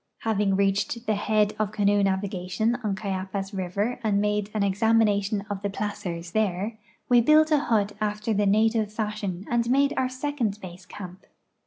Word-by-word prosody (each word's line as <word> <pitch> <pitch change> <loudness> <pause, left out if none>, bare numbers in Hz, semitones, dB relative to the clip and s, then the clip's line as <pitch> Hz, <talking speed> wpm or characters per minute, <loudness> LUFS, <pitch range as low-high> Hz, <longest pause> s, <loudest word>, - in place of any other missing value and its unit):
Having 210 -3 +1
reached 200 +4 0
the 215 - +1
head 210 0 +1
of 210 -2 0
canoe 205 -1 +2
navigation 190 +2 0
on 205 -2 -1
Cayapas 195 0 -4
river 200 +5 -2
and 205 -2 +2
made 210 0 0
an 210 - +1
examination 205 0 +2
of 200 -2 -4
the 200 - -1
placers 180 -4 -4
there, 215 +1 -1 0.3
we 245 -1 +5
built 310 +5 +5
a 300 - +5
hut 215 -6 +1
after 210 +1 -1
the 205 0 +1
native 215 +1 +2
fashion 210 -4 -3
and 235 -1 0
made 280 +2 +3
our 255 -1 +1
second 255 -6 -2
base 180 -1 -10
camp. 185 -1 -10
210 Hz, 165 wpm, -26 LUFS, 195-220 Hz, 0.3 s, we